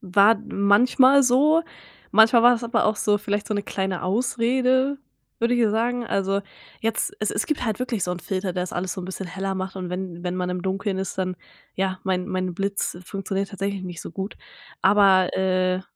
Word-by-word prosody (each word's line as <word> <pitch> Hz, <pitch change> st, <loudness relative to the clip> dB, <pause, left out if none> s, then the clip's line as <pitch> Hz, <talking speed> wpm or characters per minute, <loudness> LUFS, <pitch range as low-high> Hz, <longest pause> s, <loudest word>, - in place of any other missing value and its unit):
war 200 Hz, +2 st, +4 dB
manchmal 250 Hz, +7 st, +4 dB
so. 290 Hz, +6 st, +4 dB, 0.5 s
Manchmal 225 Hz, +1 st, +6 dB
war 245 Hz, +1 st, +7 dB
das 235 Hz, 0 st, -2 dB
aber 230 Hz, -1 st, +1 dB
auch 215 Hz, 0 st, +1 dB
so 205 Hz, 0 st, +1 dB
vielleicht 205 Hz, 0 st, -2 dB
so 215 Hz, -, -2 dB
'ne 205 Hz, -, -1 dB
kleine 190 Hz, -3 st, -3 dB
Ausrede, 255 Hz, +6 st, +1 dB, 0.4 s
würde 235 Hz, +1 st, +1 dB
ich 240 Hz, -, +1 dB
dir 220 Hz, -2 st, +3 dB
sagen. 235 Hz, +2 st, -1 dB
Also 195 Hz, 0 st, 0 dB, 0.4 s
jetzt 225 Hz, -, -1 dB
es -, -, 0 dB
es -, -, -2 dB
gibt 305 Hz, -4 st, -2 dB
halt 220 Hz, -2 st, -1 dB
wirklich 240 Hz, -6 st, -2 dB
so 180 Hz, -, -3 dB
'n 180 Hz, -, -3 dB
Filter, 185 Hz, -1 st, -3 dB
der 180 Hz, 0 st, -2 dB
das 180 Hz, -, -6 dB
alles 180 Hz, +1 st, -2 dB
so -, -, -6 dB
'n 180 Hz, -, -6 dB
bisschen 190 Hz, 0 st, -6 dB
heller 195 Hz, +2 st, -4 dB
macht 190 Hz, +1 st, -5 dB
und 180 Hz, -1 st, -5 dB
wenn 180 Hz, -2 st, -5 dB
wenn 180 Hz, 0 st, -2 dB
man 180 Hz, 0 st, -2 dB
im 180 Hz, 0 st, -3 dB
Dunkeln 190 Hz, 0 st, -2 dB
ist, 190 Hz, -, -4 dB
dann 185 Hz, -1 st, -1 dB, 0.4 s
ja, 190 Hz, -1 st, -1 dB
mein 185 Hz, -1 st, -1 dB
mein 185 Hz, -2 st, -2 dB
Blitz 195 Hz, -1 st, -2 dB
funktioniert 195 Hz, +1 st, -3 dB
tatsächlich 200 Hz, 0 st, -3 dB
nicht 175 Hz, -3 st, -7 dB
so -, -, -8 dB
gut. 195 Hz, +4 st, -6 dB, 0.5 s
Aber, 195 Hz, -2 st, +4 dB
äh, 185 Hz, -1 st, +1 dB
195 Hz, 205 wpm, -23 LUFS, 185-230 Hz, 0.5 s, war